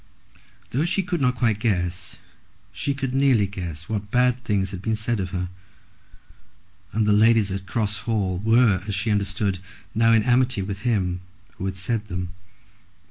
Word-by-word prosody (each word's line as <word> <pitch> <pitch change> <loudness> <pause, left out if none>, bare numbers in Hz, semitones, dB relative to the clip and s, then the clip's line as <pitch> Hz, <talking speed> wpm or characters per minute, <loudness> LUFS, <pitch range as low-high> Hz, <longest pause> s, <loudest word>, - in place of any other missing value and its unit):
Though 135 +5 +1
she 190 +3 +1
could 175 -3 -2
not 125 -1 +2
quite 115 -3 +1
guess, 90 -4 -1 0.5
she 140 - -2
could 135 -2 -3
nearly 135 -6 +4
guess 85 -5 -6
what 105 -2 -3
bad 125 +1 +2
things 100 -2 0
had 95 -2 -6
been 110 +3 0
said 110 +1 -1
of 95 -1 -2
her; 90 0 -2 1.4
and 110 0 +1
the 105 - +4
ladies 110 -1 +4
at 95 0 -4
Cross 105 -2 -1
Hall 105 -5 -1
were, 110 -2 +4
as 100 - -1
she 110 +3 0
understood, 100 -1 0 0.3
now 115 +1 +4
in 110 -2 +5
amity 125 -3 +2
with 100 0 -4
him 95 -6 0 0.4
who 95 - -4
had 95 -1 -3
said 105 +2 -2
them. 90 -1 -4
105 Hz, 170 wpm, -24 LUFS, 95-115 Hz, 1.4 s, in